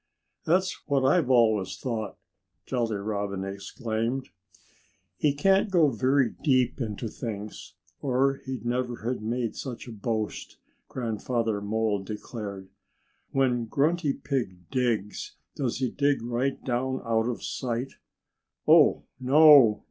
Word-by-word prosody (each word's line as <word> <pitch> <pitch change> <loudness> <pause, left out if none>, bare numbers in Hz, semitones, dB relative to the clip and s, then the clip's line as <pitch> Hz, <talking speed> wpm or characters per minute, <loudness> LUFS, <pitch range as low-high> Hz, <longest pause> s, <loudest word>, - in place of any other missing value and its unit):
"That's 185 +3 +1
what 140 -2 +2
I've 150 0 +3
always 110 -6 +3
thought!" 110 -5 -4 0.5
Jolly 120 -4 -1
Robin 100 -1 -3
exclaimed. 110 +6 -3 0.9
"He 150 - +2
can't 195 +8 +3
go 170 -6 +4
very 130 +1 +2
deep 130 -2 +2
into 110 0 -3
things, 105 -2 -7 0.3
or 135 0 +1
he'd 130 -4 -5
never 120 -1 -2
have 125 -3 -2
made 115 +1 -2
such 125 -2 -6
a - - -7
boast," 110 0 -4 0.3
Grandfather 115 -2 -2
Mole 105 -1 0
declared. 100 -2 -7 0.6
"When 125 -3 +1
Grunty 150 +5 +1
Pig 95 - -4
digs, 120 -6 -1 0.2
does 130 -4 -1
he 130 -1 -1
dig 140 -3 +1
right 125 +3 -1
down 130 +1 -1
out 115 0 +1
of 120 - -4
sight?" 125 +1 -3 0.8
"Oh, - - +6 0.2
no! 135 -4 +7
120 Hz, 120 wpm, -27 LUFS, 110-135 Hz, 0.9 s, no